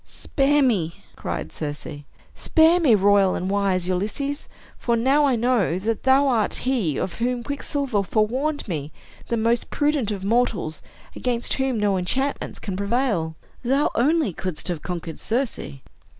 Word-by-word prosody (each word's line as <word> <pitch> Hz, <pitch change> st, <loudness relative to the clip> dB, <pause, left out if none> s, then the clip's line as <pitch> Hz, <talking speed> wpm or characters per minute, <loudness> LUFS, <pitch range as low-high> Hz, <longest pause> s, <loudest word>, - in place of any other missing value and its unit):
"Spare 285 Hz, +1 st, +1 dB
me!" 185 Hz, -11 st, +1 dB, 0.2 s
cried 70 Hz, +5 st, -4 dB
Circe. 145 Hz, -, -5 dB, 0.5 s
"Spare 325 Hz, +2 st, +4 dB
me, 275 Hz, -10 st, +5 dB
royal 200 Hz, -1 st, +4 dB
and 185 Hz, +2 st, -2 dB
wise 195 Hz, -3 st, +1 dB
Ulysses. 215 Hz, +11 st, -2 dB, 0.3 s
For 235 Hz, -, +1 dB
now 270 Hz, +6 st, +3 dB
I 270 Hz, -3 st, +3 dB
know 230 Hz, -7 st, +1 dB
that 220 Hz, +3 st, -2 dB
thou 270 Hz, +2 st, +4 dB
art 230 Hz, -5 st, +1 dB
he 230 Hz, -, +1 dB
of 185 Hz, -, -2 dB
whom 245 Hz, +1 st, -1 dB
Quicksilver 280 Hz, -4 st, -1 dB
forewarned 245 Hz, +10 st, 0 dB
me, 155 Hz, -5 st, -4 dB, 0.4 s
the 235 Hz, -, 0 dB
most 230 Hz, +1 st, +1 dB
prudent 290 Hz, -6 st, +1 dB
of 200 Hz, -3 st, -4 dB
mortals, 205 Hz, -7 st, 0 dB, 0.3 s
against 245 Hz, -1 st, -1 dB
whom 265 Hz, -4 st, 0 dB
no 205 Hz, -2 st, +2 dB
enchantments 265 Hz, +10 st, -1 dB
can 195 Hz, -3 st, -5 dB
prevail. 200 Hz, -5 st, 0 dB, 0.3 s
Thou 270 Hz, +4 st, +2 dB
only 290 Hz, -, +2 dB
couldst 185 Hz, +1 st, -3 dB
have 170 Hz, -4 st, -3 dB
conquered 170 Hz, -3 st, -5 dB
Circe. 225 Hz, -, -3 dB
230 Hz, 150 wpm, -23 LUFS, 185-265 Hz, 0.5 s, me